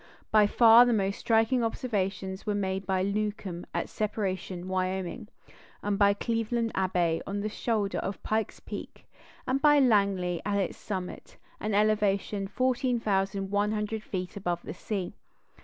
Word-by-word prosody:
By 215 -1 +6
far 230 +2 +8
the 240 - +3
most 200 -2 0
striking 230 +2 +2
observations 195 -4 -2
were 210 -1 -1
made 190 -1 -2
by 190 -1 +1
Newcomb 200 -3 -3
at - - -2
Separation 190 -4 -3
(Wyoming), 185 +3 -2 0.6
by 200 0 +3
Cleveland 230 +1 -1
Abbe 175 -3 +1
from 200 +1 -3
the 215 - -2
shoulder 210 -2 -1
of 195 - -5
Pike's 220 0 -1
Peak, - - -8 0.4
and 270 +2 +1
by 295 0 +6
Langley 200 -9 +2
at 200 0 0
its 195 -3 -1
summit, 185 -3 -6 0.2
an 215 -1 -1
elevation 205 -1 +1
of 195 - -10
14,100 210 -3 0
feet 185 -4 -5
above 175 -3 -2
the - - -6
sea. 195 -5 -4
205 Hz, 140 wpm, -28 LUFS, 190-220 Hz, 0.6 s, far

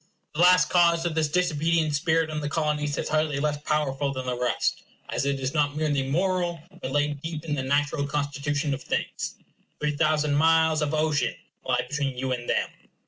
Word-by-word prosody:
The 155 - -1
last 180 +1 +6
cause 170 -1 +4
of 170 - 0
this 160 -1 +1
disobedient 160 -1 +1
spirit 160 +1 +1
in 155 - -2
the 145 -1 -3
Colonies 150 -2 -1
is - - -2
hardly 155 -2 +1
less 150 0 0
powerful 145 -2 0
than 130 -1 -5
the 125 -1 -1
rest, 125 0 0 0.3
as 140 - -1
it 140 -1 0
is 130 0 -2
not 145 -2 +1
merely 150 -2 +1
moral, 175 +1 0 0.2
but - - -3
laid 145 0 0
deep 160 -1 -5
in 155 - -2
the 140 - -1
natural 140 +2 0
constitution 145 +1 -1
of 135 - -4
things. - - -3 0.4
Three 150 0 -1
thousand 150 -1 +2
miles 160 +1 +4
of 150 +1 0
ocean 155 -2 +1 0.3
lie - - 0
between 140 -3 -2
you 130 +1 -2
and 120 -1 -3
them. - - +1
150 Hz, 195 wpm, -26 LUFS, 145-160 Hz, 0.4 s, last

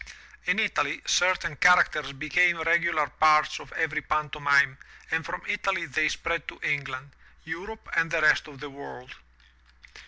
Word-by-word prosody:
In - - +1
Italy - - 0
certain 175 -5 +1
char 180 0 +7
acters 140 -3 -7
became 170 +3 +2
regular 165 -2 +2
parts 155 +1 +2
of - - -13
every 155 -1 -1
pantomime 140 -2 +1 0.3
and 160 0 0
from 180 +2 -6
Italy 195 -4 -1
they 155 +1 0
spread 170 0 -3
to - - -9
England, 140 -1 -3 0.3
Europe 185 +8 -8
and 165 0 +2
the 165 0 0
rest 155 0 +4
of 145 -3 -13
the 145 0 -8
world. 135 -2 -11
155 Hz, 150 wpm, -26 LUFS, 145-170 Hz, 0.3 s, char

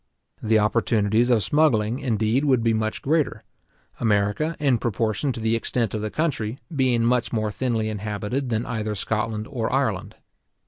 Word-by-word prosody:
The 110 0 +3
opportunities 110 +1 +2
of 115 -4 +3
smuggling, 120 - +2
indeed, 115 0 +1
would 130 -5 +3
be 115 -1 +3
much 110 0 -2
greater; 145 -7 0 0.6
America, 105 +9 +1
in 135 -6 +2
proportion 115 +5 -1
to - - -6
the 110 +1 +1
extent 115 -1 -1
of 110 - -2
the 110 - -2
country, 130 -6 -2 0.2
being 125 -4 +2
much 120 0 +1
more 110 -2 -1
thinly 110 +1 -1
inhabited 105 +5 -3
than 115 +1 -1
either 110 -3 -3
Scotland 110 +1 -2
or 120 -5 -3
Ireland. 110 -6 -1
115 Hz, 155 wpm, -24 LUFS, 110-125 Hz, 0.6 s, The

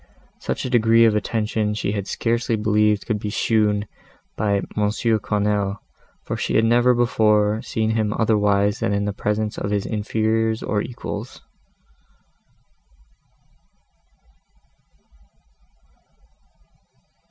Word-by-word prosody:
Such - - -3
a - - -2
degree 115 -1 +5
of 110 -2 +3
attention 105 0 -1
she 105 - -2
had 100 -2 -3
scarcely 115 +1 -1
believed 105 -1 +1
could 110 -3 -1
be 105 - -4
shown 105 -1 +1 0.5
by 105 -1 0
M. 100 - -1
Quesnel, 105 -2 0 0.5
for - - -4
she - - -2
had 110 - +4
never 120 +2 +4
before 110 -3 +2
seen 110 0 -1
him 110 -2 0
otherwise 105 -1 +1
than 100 - 0
in 100 0 0
the 105 - -2
presence 105 +1 -2
of 100 - -3
his 100 -1 -1
inferiors 110 +1 -1
or 105 0 -1
equals. 120 +2 -7
105 Hz, 110 wpm, -22 LUFS, 105-110 Hz, 0.5 s, degree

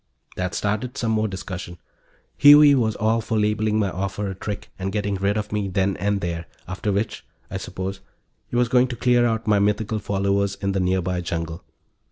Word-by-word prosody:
That 90 -2 -3
started 110 +7 -2
some 115 -2 0
more 110 0 +1
discussion. 95 -3 -6 0.6
Huey 145 0 +8
was 110 -5 +1
all 110 +2 +1
for 110 - -2
labeling 105 0 +1
my 100 -3 +1
offer 100 +2 -3
a - - -4
trick 100 +2 -6
and 95 +1 -2
getting 105 -1 -1
rid 100 +2 0
of 105 -1 -3
me 105 -1 -1
then 95 +1 0
and 100 0 0
there 85 -1 -3 0.2
after 95 +3 -2
which, 100 +2 -2 0.3
I - - -2
suppose, 95 +1 -5 0.5
he - - -6
was 120 0 +3
going 125 +1 +4
to 120 - -5
clear 120 0 +3
out 110 -1 -1
my 105 -2 +3
mythical 105 +2 0
followers 100 0 0
in 100 -1 -2
the 95 - 0
nearby 90 -1 0
jungle. 85 0 -4
100 Hz, 195 wpm, -23 LUFS, 95-110 Hz, 0.6 s, Huey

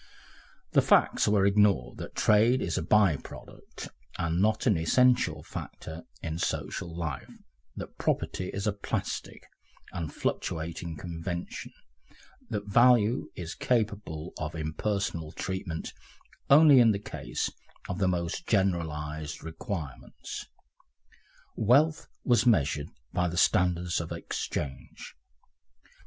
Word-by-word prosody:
The - - +5
facts - - +4
were 105 -2 +4
ignored 100 -9 +3
that - - -7
trade 115 +4 +4
is - - -2
a - - 0
bye 100 -8 +4
product - - -11 0.3
and 85 +1 0
not 110 +2 +2
an 110 -6 +4
essential 80 -2 +3
factor 80 +1 -7 0.2
in 80 +1 -3
social 85 -1 -3
life, 75 -6 -4 0.5
that - - -8
property 90 - -1
is 100 +1 -4
a 105 - +1
plastic 100 - -4 0.5
and 85 -4 -4
fluctuating 80 0 -3
convention, 85 +2 -5 0.8
that 105 -1 -3
value 120 +2 +4
is 85 -2 -5
capable 105 -9 -1
of 75 +1 -4
impersonal 80 0 -2
treatment 95 -3 -4 0.6
only 145 -1 +8
in 115 -3 +6
the - - -1
case 100 - -4 0.4
of 90 - -4
the 95 - +2
most 85 -2 -2
generalised 80 -6 -1
requirements. 80 - -6 1.1
Wealth 145 +8 +3 0.2
was 120 0 +3
measured 75 - +2 0.3
by 90 0 +1
the 85 0 -4
standards 90 -1 +2
of 80 - -7
exchange. 70 -3 -5
90 Hz, 115 wpm, -29 LUFS, 80-105 Hz, 1.1 s, only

